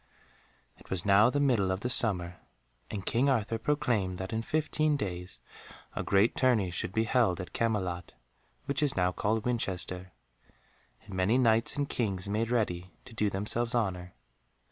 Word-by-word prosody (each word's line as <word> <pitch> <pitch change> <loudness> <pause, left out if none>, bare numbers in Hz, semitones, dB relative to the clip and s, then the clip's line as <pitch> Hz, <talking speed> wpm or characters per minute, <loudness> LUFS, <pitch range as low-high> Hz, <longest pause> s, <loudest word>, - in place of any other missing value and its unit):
It - - -18
was 95 -2 +1
now 100 +3 +6
the 145 - -1
middle 120 -9 +2
of 95 +1 -2
the 125 - -2
summer, 90 -8 +2 0.5
and 100 -3 -5
King 130 +5 +2
Arthur 115 -3 0
proclaimed 110 -8 0
that 95 +3 -5
in 110 - -1
fifteen 155 +2 0
days 90 -5 -5 0.5
a - - -2
great 100 +3 +2
tourney 115 -8 +2
should 90 - -3
be 110 +3 +1
held 115 -6 +2
at 90 - -7
Camelot, 95 -7 -2 0.5
which 140 +1 -1
is 145 -7 +2
now 90 0 +2
called 110 +4 -1
Winchester, 95 -6 -1 0.9
and 100 - -11
many 95 +6 +2
Knights 115 -1 +3
and 145 -1 0
Kings 100 -8 -1
made 110 +3 -1
ready 95 -7 -2
to 120 - -12
do 105 -2 0
themselves 115 +5 -1
honour. 90 -6 -2
105 Hz, 165 wpm, -30 LUFS, 95-120 Hz, 0.9 s, now